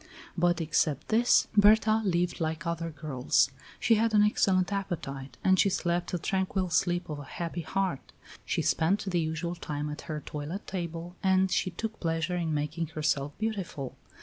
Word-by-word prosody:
But 175 Hz, 0 st, +2 dB
except 155 Hz, -3 st, 0 dB
this, 235 Hz, +3 st, +4 dB
Berta 215 Hz, +1 st, +5 dB
lived 175 Hz, -3 st, 0 dB
like 160 Hz, +1 st, -2 dB
other 170 Hz, 0 st, -2 dB
girls; 145 Hz, -4 st, +1 dB, 0.3 s
she 235 Hz, -, +4 dB
had 225 Hz, -1 st, +2 dB
an 210 Hz, -, +6 dB
excellent 195 Hz, -2 st, +2 dB
appetite 140 Hz, -8 st, -4 dB
and 190 Hz, -1 st, +4 dB
she 200 Hz, -, +5 dB
slept 175 Hz, -2 st, -1 dB
the 180 Hz, -, 0 dB
tranquil 190 Hz, +1 st, -1 dB
sleep 175 Hz, +2 st, +1 dB
of 150 Hz, -2 st, -5 dB
a -, -, -7 dB
happy 170 Hz, +4 st, -4 dB
heart. 190 Hz, -4 st, -2 dB, 0.3 s
She -, -, -1 dB
spent 180 Hz, +6 st, +2 dB
the 180 Hz, -3 st, 0 dB
usual 160 Hz, +2 st, -2 dB
time 150 Hz, -3 st, -4 dB
at 150 Hz, -, -6 dB
her 155 Hz, -1 st, -3 dB
toilet 150 Hz, +7 st, -5 dB
table 170 Hz, -1 st, -5 dB
and 190 Hz, -1 st, +3 dB
she 185 Hz, -, +1 dB
took 220 Hz, +5 st, -5 dB
pleasure 165 Hz, +1 st, -1 dB
in 170 Hz, -2 st, -1 dB
making 155 Hz, +2 st, -2 dB
herself 145 Hz, -2 st, -1 dB
beautiful. 195 Hz, -, -3 dB
175 Hz, 170 wpm, -29 LUFS, 155-190 Hz, 0.3 s, an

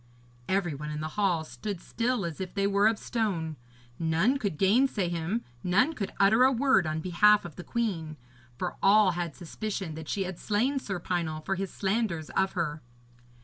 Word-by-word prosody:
Every 190 Hz, -4 st, +1 dB
one 150 Hz, +2 st, -6 dB
in 150 Hz, 0 st, -4 dB
the 155 Hz, +1 st, -3 dB
hall 190 Hz, -6 st, +1 dB
stood 200 Hz, +3 st, -6 dB
still 230 Hz, +2 st, -1 dB
as 170 Hz, +1 st, -5 dB
if 185 Hz, 0 st, -6 dB
they 200 Hz, -1 st, +1 dB
were 200 Hz, +1 st, +4 dB
of 220 Hz, -1 st, +2 dB
stone. 190 Hz, -11 st, -2 dB, 0.4 s
None 170 Hz, +12 st, +2 dB
could 200 Hz, -, -2 dB
gainsay 200 Hz, -, +3 dB
him, 175 Hz, +7 st, -2 dB, 0.2 s
none 250 Hz, -, +3 dB
could 200 Hz, -10 st, -4 dB
utter 220 Hz, +5 st, +5 dB
a 260 Hz, -, +6 dB
word 250 Hz, -, +3 dB
on 155 Hz, 0 st, -2 dB
behalf 205 Hz, +4 st, +4 dB
of 170 Hz, -, -8 dB
the 180 Hz, -, -8 dB
queen, 175 Hz, -11 st, -2 dB, 0.4 s
for 180 Hz, -, -3 dB
all 200 Hz, -1 st, +6 dB
had 170 Hz, -3 st, -4 dB
suspicion 190 Hz, 0 st, -5 dB
that 160 Hz, 0 st, -8 dB
she 200 Hz, -, 0 dB
had 185 Hz, -2 st, -6 dB
slain 245 Hz, +7 st, +1 dB
Sir 195 Hz, -7 st, -4 dB
Pinel 170 Hz, -3 st, -2 dB
for -, -, 0 dB
his 195 Hz, 0 st, -3 dB
slanders 190 Hz, -6 st, -1 dB
of 190 Hz, 0 st, +1 dB
her. 160 Hz, -3 st, -2 dB
190 Hz, 190 wpm, -28 LUFS, 165-215 Hz, 0.4 s, a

